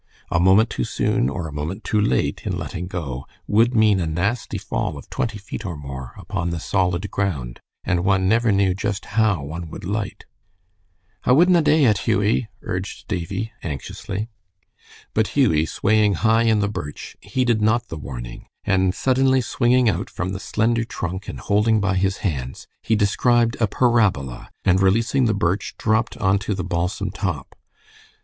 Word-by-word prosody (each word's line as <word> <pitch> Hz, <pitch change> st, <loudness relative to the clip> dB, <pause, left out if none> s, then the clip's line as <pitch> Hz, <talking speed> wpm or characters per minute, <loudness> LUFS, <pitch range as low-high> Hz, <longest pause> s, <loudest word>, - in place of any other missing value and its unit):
A 85 Hz, -, +2 dB
moment 95 Hz, +6 st, +5 dB
too 65 Hz, -, -2 dB
soon 60 Hz, -, 0 dB
or 80 Hz, +3 st, -4 dB
a 75 Hz, -, -8 dB
moment 80 Hz, +8 st, -4 dB
too 105 Hz, -2 st, +1 dB
late 65 Hz, -11 st, +1 dB
in -, -, -2 dB
letting 90 Hz, -, -5 dB
go, 70 Hz, -8 st, -5 dB, 0.2 s
would 115 Hz, +4 st, +3 dB
mean 110 Hz, -3 st, +4 dB
a 85 Hz, -, -1 dB
nasty 100 Hz, +9 st, -1 dB
fall -, -, -3 dB
of -, -, -11 dB
twenty 115 Hz, -3 st, -2 dB
feet 100 Hz, +2 st, -7 dB
or 90 Hz, -7 st, -5 dB
more 65 Hz, -3 st, -8 dB
upon 85 Hz, -, -3 dB
the 85 Hz, -1 st, -3 dB
solid 90 Hz, +2 st, 0 dB
ground, 70 Hz, -12 st, -2 dB, 0.2 s
and 85 Hz, -1 st, 0 dB
one 95 Hz, -1 st, +2 dB
never 115 Hz, +2 st, +3 dB
knew 100 Hz, -2 st, +3 dB
just 100 Hz, +1 st, -3 dB
how 110 Hz, -9 st, +2 dB
one 80 Hz, +3 st, -6 dB
would -, -, -9 dB
light. 100 Hz, +2 st, -3 dB, 1.0 s
"I 125 Hz, -, +4 dB
wudna 175 Hz, +4 st, +5 dB
dae 150 Hz, 0 st, +4 dB
it, 105 Hz, -4 st, +3 dB
Hughie," 105 Hz, +3 st, +2 dB, 0.2 s
urged 90 Hz, +2 st, -5 dB
Davie, 95 Hz, +3 st, -3 dB
anxiously. 95 Hz, -, -5 dB, 0.9 s
But 110 Hz, +5 st, 0 dB
Hughie, 80 Hz, -, +3 dB
swaying 105 Hz, +3 st, +2 dB
high 115 Hz, +6 st, +3 dB
in 110 Hz, -2 st, +3 dB
the 100 Hz, -, +1 dB
birch, 75 Hz, -8 st, -6 dB
heeded 120 Hz, -4 st, 0 dB
not 110 Hz, +2 st, +2 dB
the -, -, -5 dB
warning, -, -, -8 dB, 0.2 s
and 95 Hz, -1 st, +2 dB
suddenly 130 Hz, 0 st, +3 dB
swinging 125 Hz, 0 st, +2 dB
out 110 Hz, -, 0 dB
from 90 Hz, -, -3 dB
the 95 Hz, 0 st, -4 dB
slender 115 Hz, +3 st, +1 dB
trunk 95 Hz, -3 st, -5 dB
and -, -, -6 dB
holding 105 Hz, +2 st, +2 dB
by 100 Hz, -1 st, +1 dB
his 95 Hz, +1 st, +1 dB
hands, 65 Hz, -7 st, -3 dB, 0.2 s
he 110 Hz, -, +1 dB
described 115 Hz, +3 st, +2 dB
a 110 Hz, -, +3 dB
parabola, 100 Hz, -, +1 dB, 0.2 s
and 95 Hz, 0 st, +4 dB
releasing 115 Hz, +7 st, +3 dB
the 110 Hz, -2 st, +2 dB
birch 100 Hz, 0 st, -1 dB
dropped 110 Hz, +1 st, 0 dB
on 95 Hz, +1 st, +2 dB
to 100 Hz, +1 st, -2 dB
the 95 Hz, -, -3 dB
balsam 90 Hz, +3 st, -2 dB
top. 90 Hz, -, -4 dB
100 Hz, 170 wpm, -22 LUFS, 85-110 Hz, 1.0 s, moment